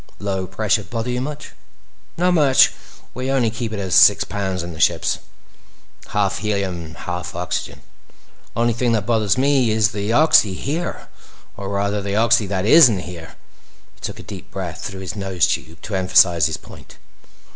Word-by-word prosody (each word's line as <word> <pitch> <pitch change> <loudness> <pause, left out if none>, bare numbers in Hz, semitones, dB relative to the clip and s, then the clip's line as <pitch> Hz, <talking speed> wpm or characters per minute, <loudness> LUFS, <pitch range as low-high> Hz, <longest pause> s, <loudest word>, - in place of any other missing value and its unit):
"Low 95 -2 -3
pressure 105 +3 0
bother 115 +3 -4
you 125 0 -2
much?" 150 +2 -6 0.7
"Not 180 +1 +2
much. 145 -6 +5 0.4
We 130 +2 -4
only 130 -5 +1
keep 115 -1 -5
it 110 - -4
at 95 -3 -3
six - - +6
pounds 95 -3 -3
in 85 0 -7
the 80 - -11
ships. - - +1 0.9
Half 100 -2 -1
helium 100 -5 -2
and 80 0 -12
half 90 0 -6
oxygen. 90 0 -4 0.7
Only 120 0 +1
thing 120 0 0
that 105 -4 0
bothers 110 -3 +1
me 135 -2 +2
is 110 -1 +2
the 105 0 -3
oxy 115 -8 +4
here. 160 - -4 0.5
Or 100 -1 -6
rather, 100 +1 -1
the 100 0 -3
oxy 115 -1 +3
that 95 0 -2
isn't 120 - +6
here." 85 -2 -10 0.6
He - - -28
took - - -6
a - - -10
deep - - -10
breath - - -6
through 95 -1 -6
his 95 - -6
nose 95 -5 0
tube 80 0 -4
to 105 - -7
emphasize 90 -3 +4
his 80 - -4
point. - - -15
105 Hz, 175 wpm, -20 LUFS, 95-120 Hz, 0.9 s, six